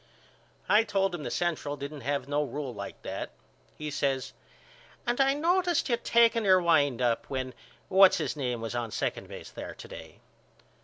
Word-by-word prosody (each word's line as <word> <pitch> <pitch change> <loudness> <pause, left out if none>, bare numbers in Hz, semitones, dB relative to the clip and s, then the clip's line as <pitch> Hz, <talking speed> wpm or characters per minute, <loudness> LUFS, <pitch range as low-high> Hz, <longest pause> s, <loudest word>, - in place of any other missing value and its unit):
I 210 +2 +5
told 195 -3 0
him 175 - -4
the - - -4
Central 160 -4 -1
didn't 140 +1 -7
have 140 +3 -2
no 145 +1 +1
rule 140 -2 -5
like 100 -2 -7
that. - - -4 0.5
He 150 0 -5
says 135 -2 -1 0.7
And 240 +2 +1
I 270 +1 +4
noticed 350 +1 +1
you 235 - +2
taking 230 -1 +3
your 190 -2 +6
wind 145 -8 +3
up 120 -2 0
when 130 -1 -3 0.3
What's 190 0 +6
His 155 -4 -2
Name 125 -5 -2
was 115 0 -4
on 120 -1 -2
second - - -3
base - - -9
there - - -7
to - - -11
day. - - -11
150 Hz, 175 wpm, -29 LUFS, 135-205 Hz, 0.7 s, your